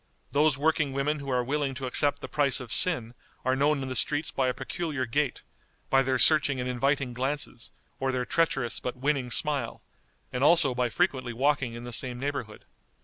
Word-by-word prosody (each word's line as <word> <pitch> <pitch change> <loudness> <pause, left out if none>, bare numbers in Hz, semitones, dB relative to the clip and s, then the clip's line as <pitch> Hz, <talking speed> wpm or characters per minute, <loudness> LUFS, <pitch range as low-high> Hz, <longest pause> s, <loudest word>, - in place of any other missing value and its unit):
Those 150 -1 +3
working 150 -1 +1
women 145 +2 -1
who 140 -1 -7
are 125 -1 +1
willing 140 +1 -2
to 130 0 -5
accept 145 +3 +1
the - - -6
price 140 -3 +2
of 125 -4 -8
sin 120 - +3 0.3
are 130 0 +2
known 140 +1 +1
in - - -5
the 130 - -4
streets 145 +5 +1
by 130 -1 0
a - - +2
peculiar 145 0 -3
gait, 135 +3 -1 0.5
by 135 - +5
their 130 -1 0
searching 145 0 +4
and 125 - -3
inviting 135 +1 0
glances, 130 -1 -4 0.3
or 135 0 0
their 125 -1 -2
treacherous 135 -8 +1
but 125 0 -5
winning 135 -1 -1
smile, 140 -3 0 0.5
and 125 +1 -1
also 150 -3 +4
by 125 0 0
frequently 130 +1 -1
walking 130 -1 0
in 120 - -8
the 120 0 -7
same 125 +1 -3
neighborhood. 135 -6 -5
135 Hz, 195 wpm, -27 LUFS, 125-145 Hz, 0.5 s, by